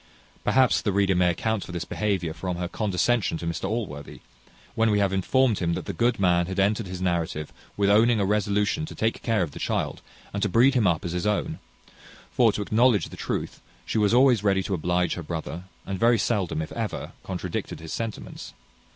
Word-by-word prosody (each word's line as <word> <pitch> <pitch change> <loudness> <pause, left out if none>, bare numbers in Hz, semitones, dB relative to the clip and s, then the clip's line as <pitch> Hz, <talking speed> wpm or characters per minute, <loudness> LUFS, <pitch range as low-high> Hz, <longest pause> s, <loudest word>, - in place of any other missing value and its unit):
Perhaps 130 -2 +3
the 105 - 0
reader 100 0 +2
may 90 -1 +3
account 110 +4 -1
for - - -9
this 85 -1 -4
behaviour 95 -6 -1
from 90 +2 -4
her 90 0 -2
condescension 100 -1 0
to 85 - -6
Mr 85 +3 -3
Allworthy, 95 -11 -5 0.5
when 115 0 +2
we 105 - +2
have 100 -2 +1
informed 115 +4 +2
him 85 -2 0
that - - -4
the 100 - -4
good 120 +5 +1
man 90 -2 +3
had 95 +1 -3
ended 105 +2 +1
his 90 0 -5
narrative 85 -4 -2 0.2
with 100 -1 +2
owning 110 +2 +4
a 100 - +2
resolution 105 +6 +1
to - - -9
take 110 +1 -1
care 115 -5 +1
of 80 - -4
the - - -9
child, - - -2 0.3
and 100 - -2
to 105 - +1
breed 120 +7 +5
him 120 -7 +3
up 85 +2 +1
as 85 - -2
his 90 +4 -1
own; 105 -1 -1 0.7
for, 115 -3 +4
to 105 - -3
acknowledge 110 -3 +3
the - - -10
truth, - - -4 0.2
she - - -1
was 105 -1 +3
always 125 -3 +5
ready 95 -2 +2
to 100 - -3
oblige 90 +1 0
her 90 - -5
brother, 85 +2 -5 0.2
and 95 -1 -4
very 120 0 +4
seldom, 95 -7 0
if - - -9
ever, 115 -2 -4
contradicted - - -4
his 80 0 -7
sentiments. 115 -2 -6
100 Hz, 210 wpm, -25 LUFS, 90-110 Hz, 0.7 s, breed